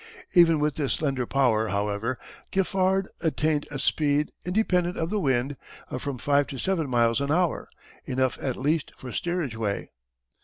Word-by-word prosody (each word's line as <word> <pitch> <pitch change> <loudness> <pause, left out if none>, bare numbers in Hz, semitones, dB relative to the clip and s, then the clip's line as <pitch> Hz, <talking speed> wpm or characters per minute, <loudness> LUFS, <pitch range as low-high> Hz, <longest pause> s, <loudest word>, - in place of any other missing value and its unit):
Even 165 -4 +6
with 150 -1 0
this 145 -4 0
slender 135 -5 -1
power, 115 -5 +2
however, 105 +4 -1 0.3
Giffard 190 0 +1
attained 155 -2 0
a 145 - -5
speed, 150 +1 +1
independent 180 -2 +1
of 165 +2 -2
the 210 - +1
wind, 135 -3 0 0.3
of 130 - -3
from 140 -2 -3
five 145 +2 +2
to 135 - -6
seven 165 -3 0
miles 120 0 +2
an 140 0 -1
hour 175 0 +1 0.4
enough 130 0 0
at 130 -2 -2
least 150 +3 0
for 125 - -8
steerage 175 -9 -2
way. 105 -3 -3
145 Hz, 160 wpm, -26 LUFS, 130-170 Hz, 0.4 s, Even